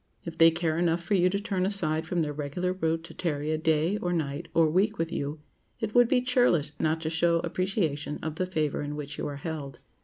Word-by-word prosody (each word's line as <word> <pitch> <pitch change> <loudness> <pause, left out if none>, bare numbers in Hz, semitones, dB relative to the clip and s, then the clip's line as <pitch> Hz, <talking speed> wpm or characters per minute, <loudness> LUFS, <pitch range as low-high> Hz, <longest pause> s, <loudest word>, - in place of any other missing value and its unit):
If 165 -1 -6
they 165 0 +9
care 165 -1 -1
enough 170 0 +1
for 205 - -1
you 180 -2 +4
to 200 +2 -1
turn 200 -3 -1
aside 160 -5 0
from 170 -1 0
their 150 -1 -3
regular 150 +5 -2
route 165 -2 -1
to 170 - -10
tarry 150 -3 -2
a 155 - +1
day, 160 +4 +2
or 175 -3 -2
night, 160 -1 -2
or 165 -1 +5
week 200 +7 +1
with 165 0 -2
you, 145 +2 -3 0.4
it 220 -1 -3
would 245 -1 +6
be 250 0 +3
churlish 245 - +3
not 160 +1 +1
to 160 - -2
show 170 +1 +2
appreciation 170 -7 -1
of 160 0 -4
the 185 - -1
favor 155 -5 -1
in 145 0 -4
which 150 0 -6
you - - -2
are 145 - -5
held. 145 -2 -6
165 Hz, 235 wpm, -28 LUFS, 155-185 Hz, 0.4 s, they